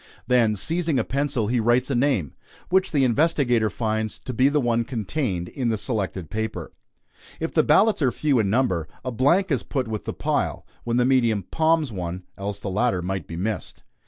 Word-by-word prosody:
Then 115 -4 +3
seizing 165 - -1
a 120 - +2
pencil, 135 -4 -1
he 120 +3 +1
writes 120 +4 +2
a - - +1
name, 120 - +1 0.4
which 190 +1 +2
the 140 -3 +2
investigator 125 -4 +2
finds 110 -1 -2
to 130 - -4
be 130 +4 +4
the 150 +1 +1
one 120 -3 +1
contained 110 - -2
in 125 -3 -2
the 110 - 0
selected 95 - -3
paper. 110 +1 -4 0.7
If 165 - -2
the 155 - +4
ballots 195 +6 +4
are 130 -3 +3
few 145 -3 +1
in 100 -3 +1
number, 100 -9 +1 0.2
a 130 - -2
blank 155 - +2
is 135 - +1
put 130 -4 -3
with 110 -1 -4
the - - -3
pile, - - -1 0.2
when 120 0 0
the 125 - +3
medium 120 -6 +2
"palms" 160 - +1
one, 90 -2 -5
else 100 0 -4
the 100 -1 -5
latter 95 -3 +1
might 95 -2 -3
be 85 - -7
missed. 105 +5 -4
120 Hz, 195 wpm, -24 LUFS, 105-140 Hz, 0.7 s, be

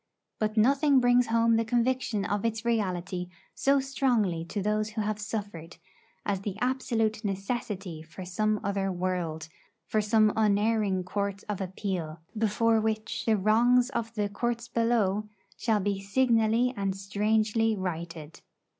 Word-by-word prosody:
But 215 0 -1
nothing 275 +4 +4
brings 245 0 +4
home 230 0 +3
the 230 - +2
conviction 240 -2 0
of 205 0 -1
its 225 0 -2
reality 185 -5 -1 0.2
so 275 0 +3
strongly 245 -10 0
to 205 +5 -4
those 210 +1 0
who 215 0 -3
have 210 0 -2
suffered, 205 -6 -5 0.5
as 200 -2 0
the 200 -1 -4
absolute 230 -4 0
necessity 195 -4 -3
for 165 +4 -10
some 215 +4 0
other 195 -1 -1
world; 175 -3 -2 0.4
for 215 - +1
some 215 0 +3
unerring 210 -2 +2
court 200 +1 -3
of 205 -2 -3
appeal, 185 -4 -4 0.2
before 225 +1 +2
which 215 0 -2
the 220 -1 +4
wrongs 240 +5 +3
of 230 -4 -3
'the 205 -2 0
courts 235 +2 -2
below' 215 -4 +1 0.3
shall 220 -3 +1
be 200 0 -1
signally 230 +2 +2
and 195 -2 -1
strangely 215 +3 +1
righted. 165 -4 -5
215 Hz, 140 wpm, -28 LUFS, 195-230 Hz, 0.5 s, nothing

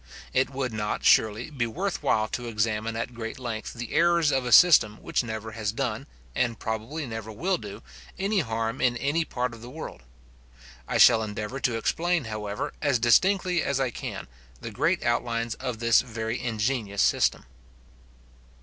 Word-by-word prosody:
It 130 +1 +2
would 130 -3 -3
not, 105 -1 -3
surely, 110 +6 +3
be 125 -5 -1
worth 185 - -3
while 110 -7 +1
to 120 -1 -4
examine 110 0 -1
at 115 +2 -4
great 115 -1 -6
length 120 -4 -5
the 120 -1 -6
errors 170 -2 +3
of 130 -2 0
a - - -2
system 115 -10 +7
which - - 0
never 110 -1 -5
has 110 -2 -2
done, 115 -2 -3 0.3
and 120 - 0
probably 110 +8 -4
never 110 -2 -6
will 175 - -1
do, 105 0 -9 0.3
any 195 +2 +1
harm 115 -4 -2
in 120 -1 +2
any 145 +6 0
part 125 -4 -3
of 115 - -11
the 120 - -9
world. 150 - -8 0.9
I - - 0
shall 115 -2 +7
endeavour 110 +4 -4
to 120 -2 0
explain, 170 +7 0
however, 105 -2 -4
as 140 -4 +2
distinctly 180 - +3
as 140 -1 -1
I 130 -2 0
can, - - -6 0.3
the - - -7
great - - 0
outlines 120 -1 0
of 125 -3 -4
this 115 0 +4
very 115 -1 -4
ingenious 110 -3 -1
system. - - +2
120 Hz, 170 wpm, -26 LUFS, 110-135 Hz, 0.9 s, system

